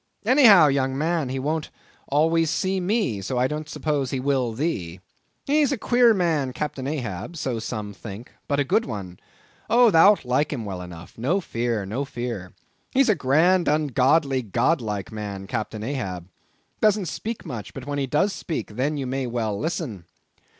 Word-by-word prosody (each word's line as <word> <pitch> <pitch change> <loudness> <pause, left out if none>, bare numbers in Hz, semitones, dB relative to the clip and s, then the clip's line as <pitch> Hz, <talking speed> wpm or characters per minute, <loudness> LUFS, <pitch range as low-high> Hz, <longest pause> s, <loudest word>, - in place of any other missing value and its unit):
Any 260 +4 +5
how, 195 -8 +9
young 135 -2 +1
man, 160 -2 0
he 130 - -3
won't 150 +4 -2 0.4
always 160 +3 +2
see 190 +3 0
me, 185 - 0
so 95 +7 -3
I 125 - +3
don't 150 +3 -3
suppose 145 -4 -1
he 135 - -2
will 130 -3 0
thee. 110 - -3 0.5
He's 290 0 +3
a 275 - 0
queer 240 +1 +4
man, 160 -8 0
Captain 135 -2 -4
Ahab—so 125 - -3
some 105 -2 -5
think—but 115 +7 -6
a - - +3
good 220 +12 +1
one. 95 -4 -6 0.5
Oh, 235 0 +6
thou'lt 195 +1 +6
like 130 +4 +1
him 125 -7 -4
well 95 -3 -5
enough; 90 +2 -11
no 155 +12 +1
fear, 115 - -2
no 115 +8 -2
fear. 120 -8 -5 0.4
He's 265 -2 +3
a 215 - +5
grand, 170 +7 +3
ungodly, 140 -1 +2
god 125 - +1
like 105 -4 -4
man, 100 -3 -6
Captain 110 +1 -4
Ahab; 95 -9 -4 0.5
doesn't 210 -2 +3
speak 220 +7 -5
much; 120 - -6
but, 130 - -7
when 145 0 -3
he 135 - -1
does 195 +9 +1
speak, 155 - -5
then 145 +4 0
you 135 - -3
may 130 0 -2
well 115 -3 -2
listen. 105 - -4
135 Hz, 170 wpm, -24 LUFS, 115-165 Hz, 0.5 s, how